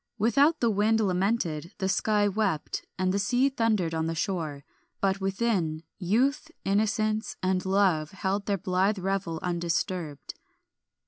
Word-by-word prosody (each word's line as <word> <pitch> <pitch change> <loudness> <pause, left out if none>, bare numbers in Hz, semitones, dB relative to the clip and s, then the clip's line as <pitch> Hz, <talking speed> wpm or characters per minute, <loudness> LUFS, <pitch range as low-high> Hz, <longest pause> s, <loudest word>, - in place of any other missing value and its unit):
Without 275 +9 +3
the 235 -2 +3
wind 215 +2 +2
lamented, 185 -4 0
the 190 - -1
sky 205 +1 +2
wept, 200 -7 -1
and 185 0 +1
the 200 - +1
sea 245 +7 +2
thundered 220 -10 0
on 160 0 -1
the 165 - -2
shore; 160 -5 -2 0.4
but 195 0 0
within, 190 -6 0 0.2
youth, 250 - +1 0.2
innocence, 215 +2 0
and 185 0 +1
love 190 -6 +2
held 195 +1 -2
their 200 -1 +1
blithe 190 +3 +1
revel 190 -3 -2
undisturbed. 170 -3 -2
195 Hz, 135 wpm, -27 LUFS, 175-215 Hz, 0.4 s, Without